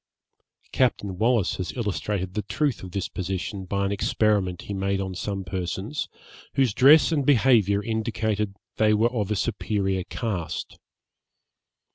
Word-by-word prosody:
Captain 105 -7 +1
Wallis 115 -3 +2
has 95 - -4
illustrated 100 -4 -2
the 105 - -1
truth 145 +1 -1
of 95 - -7
this 95 +1 -3
position 95 +1 -4
by 100 +1 -1
an 100 - -1
experiment 100 -3 +1
he 100 - -5
made 100 0 -1
on 95 -1 -3
some 95 +1 -3
persons, 95 - -3 0.5
whose 130 -6 +3
dress 145 +8 +6
and 150 -3 +1
behaviour 115 -7 +4
indicated 110 -2 -1
that - - -37 0.2
they 105 -1 +4
were 115 +3 +2
of 105 -5 -1
a 105 - +1
superior 100 -3 -1
cast. 100 -9 -4
105 Hz, 145 wpm, -25 LUFS, 95-115 Hz, 0.5 s, dress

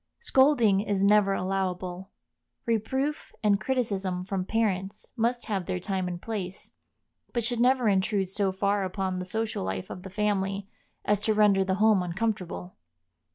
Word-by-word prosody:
Scolding 265 - +4
is 200 -2 0
never 200 -1 +5
allowable; 185 -1 -2 0.6
reproof 265 +6 -1
and 205 -1 +3
criticism 200 -7 -1
from 190 -1 -2
parents 200 -3 -1
must 240 +1 0
have 195 -5 -2
their 185 -1 -1
time 185 0 -2
and 175 -1 -4
place, 195 -3 -5 0.6
but 235 - 0
should 235 +1 0
never 250 -1 +3
intrude 195 0 +2
so 195 +1 0
far 200 +1 0
upon 185 0 -2
the 180 - -4
social 220 - -2
life 95 0 -4
of 180 - -7
the 190 - -8
family 200 0 -1 0.4
as 210 -1 +2
to 215 +1 +1
render 205 -2 +4
the 190 0 0
home 210 -1 +4
uncomfortable. 180 -1 -3
200 Hz, 155 wpm, -27 LUFS, 185-220 Hz, 0.6 s, never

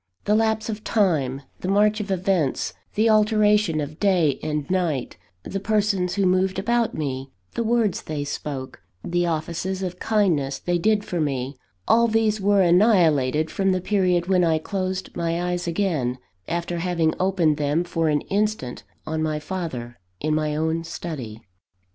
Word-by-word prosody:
The 210 - +2
lapse 220 0 +1
of 215 -1 -5
time, 145 - +1 0.2
the - - -5
march 210 +2 +3
of 210 -1 -4
events, 185 -6 0 0.2
the 220 +2 +3
alternation 210 -5 +3
of 150 +1 -5
day 180 -8 +2
and 150 -2 -2
night, 170 -8 -1 0.3
the 195 - -4
persons 200 -3 +1
who 200 -1 +1
moved 185 +1 +2
about 235 +3 +1
me, 135 -3 -3 0.2
the 235 - -1
words 225 -4 +1
they 150 -2 -4
spoke, 135 -2 -5 0.2
the 175 0 0
offices 170 +4 -2
of 180 -1 -4
kindness 170 -11 +1
they 175 0 -1
did 210 +2 +2
for 175 -2 -2
me 135 -2 -2 0.3
all 235 +1 +5
these 220 -2 +1
were 200 0 +4
annihilated 165 - +3
from 195 -1 +1
the 185 - 0
period 180 -3 +1
when 185 -1 +3
I 165 -2 +3
closed 185 +2 -3
my 170 +1 -1
eyes 175 0 -2
again, 165 -9 0 0.3
after 170 0 -2
having 170 -2 +1
opened 180 -5 +2
them 150 +3 +1
for 165 -2 0
an 150 -1 +1
instant 205 -11 -2 0.2
on 155 0 -2
my 155 -1 0
father, 150 - -5 0.2
in 155 +1 0
my 155 -1 0
own 160 +1 0
study. 130 -10 -6
175 Hz, 160 wpm, -23 LUFS, 155-200 Hz, 0.3 s, all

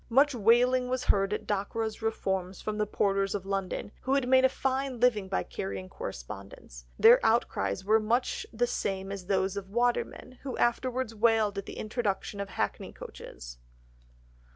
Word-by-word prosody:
Much 275 +4 +4
wailing 250 +3 +4
was 255 0 -1
heard 195 -3 +2
at 210 - -2
Dockwra's 215 +2 -2
reforms 190 -4 -2
from 215 0 -4
the 210 - +1
porters 195 -1 +1
of 195 -2 -4
London, 195 0 -3
who 265 +1 +1
had 275 -3 +1
made 260 0 +5
a 260 - +6
fine 265 -1 -2
living 220 -5 +3
by 90 - -1
carrying 95 0 -5
correspondence, - - -8
their - - +7
outcries 100 - +1
were 215 +2 +5
much 235 +4 0
the 240 +2 +1
same 195 -4 -2
as 195 -2 -6
those 190 0 +1
of 200 -1 -5
the 195 - -17
watermen, 245 +1 -1
who 270 -2 -5
afterwards 250 0 0
wailed 220 -2 +2
at 200 - -8
the - - -7
introduction 215 -2 -2
of 200 0 -4
hackney - - -3
coaches. - - -10
210 Hz, 170 wpm, -29 LUFS, 195-245 Hz, -, their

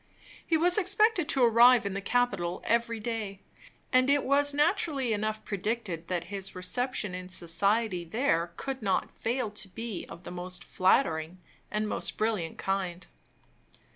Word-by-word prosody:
He 325 - +2
was 355 +5 +4
expected 400 -3 +2
to 270 -5 +2
arrive 235 0 +6
in 200 - -2
the 195 - -3
capital 200 -7 0
every 230 0 +1
day; 215 -3 -4 0.5
and 255 +1 +4
it 285 0 +4
was 285 +1 +3
naturally 295 - +1
enough 215 +1 -2
predicted 200 -4 -3
that 175 -2 -1
his 195 -1 -5
reception 210 +2 -2
in 180 0 -6
society 185 +2 0
there 170 -3 0
could 270 -2 -4
not 195 -3 -1
fail 235 -1 -1
to 210 -1 -3
be 225 0 -6
of 170 +1 -10
the - - -8
most 180 0 -4
flattering 175 -4 +1 0.3
and 215 0 -1
most - - -3
brilliant 215 -7 -1
kind. 185 -2 -2
215 Hz, 150 wpm, -29 LUFS, 185-255 Hz, 0.5 s, arrive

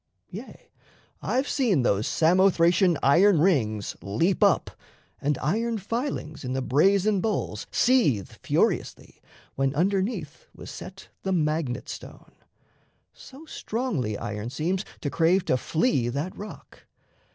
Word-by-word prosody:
Yea, - - -10 0.5
I've 260 +3 0
seen 210 - +1
Those 105 -2 +1
Samothracian 175 0 +3
iron 175 +6 +5
rings 115 - +1
leap 160 - 0
up, - - +3 0.5
And 145 -1 0
iron 225 +9 -1
filings 215 - -4
in 125 0 -3
the 130 - -1
brazen 195 +9 +3
bowls 220 +1 -2
Seethe 215 - +2
furiously, - - -1 0.3
when 135 +1 -1
underneath 190 - -1
was - - -9
set 190 +1 -10
The 190 - -2
magnet 155 -6 -1
stone. - - -10 0.8
So 275 +4 -13
strongly 205 - -3
iron 105 +2 -5
seems 175 +8 -2 0.2
To 145 - -3
crave 175 +3 +2
to - - +2
flee 135 - 0
that 145 +9 -3
rock. 210 +1 -11
170 Hz, 120 wpm, -26 LUFS, 135-200 Hz, 0.8 s, iron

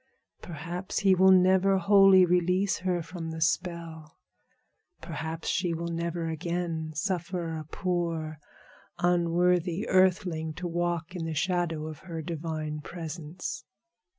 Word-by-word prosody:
Perhaps 175 +5 -4
he 195 -2 +5
will 190 +1 +5
never 190 +1 +5
wholly 195 0 +6
release 180 +2 +2
her 180 -2 -1
from 165 0 -6
the 160 0 -5
spell. 165 -1 -2 0.8
Perhaps 160 0 -5
she 175 -2 0
will 170 +1 -4
never 170 0 -2
again 165 -1 -3
suffer 175 -1 -2
a 155 -1 -6
poor, 165 -2 -2 0.6
unworthy 175 +2 +1
earthling 180 -4 +2
to 180 +2 -4
walk 175 0 -2
in 170 -2 -3
the 160 -1 -3
shadow 170 -1 0
of 155 -2 -7
her 165 -4 -6
divine 155 -2 -4
presence." 165 0 -6
170 Hz, 125 wpm, -28 LUFS, 160-180 Hz, 0.8 s, wholly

